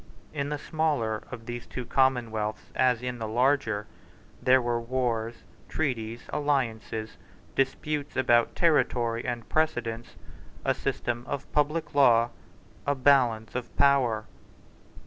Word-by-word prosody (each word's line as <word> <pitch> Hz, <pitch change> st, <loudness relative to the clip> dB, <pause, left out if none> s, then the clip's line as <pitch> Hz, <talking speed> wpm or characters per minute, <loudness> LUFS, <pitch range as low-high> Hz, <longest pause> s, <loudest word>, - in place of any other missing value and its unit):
In 140 Hz, -2 st, -2 dB
the 150 Hz, -, -2 dB
smaller 145 Hz, -9 st, -1 dB
of 115 Hz, -2 st, -8 dB
these 120 Hz, 0 st, -6 dB
two 125 Hz, -, -5 dB
commonwealths, 115 Hz, -6 st, 0 dB
as 125 Hz, -2 st, +2 dB
in 125 Hz, -1 st, -3 dB
the 110 Hz, -, -3 dB
larger, 115 Hz, -3 st, +1 dB, 0.6 s
there 130 Hz, +1 st, +5 dB
were 120 Hz, -1 st, -1 dB
wars, 115 Hz, -2 st, -2 dB, 0.3 s
treaties, 120 Hz, -6 st, -2 dB
alliances, 115 Hz, -7 st, -1 dB, 0.4 s
disputes 145 Hz, +2 st, -1 dB
about 120 Hz, -2 st, +3 dB
territory 120 Hz, -8 st, +2 dB
and 120 Hz, -2 st, -4 dB
precedence, 120 Hz, -7 st, -1 dB, 0.5 s
a -, -, +3 dB
system 120 Hz, 0 st, -2 dB
of 140 Hz, 0 st, -5 dB
public 150 Hz, +2 st, 0 dB
law, 120 Hz, -4 st, +5 dB, 0.6 s
a 145 Hz, -, +2 dB
balance 125 Hz, -5 st, +3 dB
of 125 Hz, -1 st, -5 dB
power. 130 Hz, -6 st, +3 dB
125 Hz, 120 wpm, -28 LUFS, 115-140 Hz, 0.6 s, there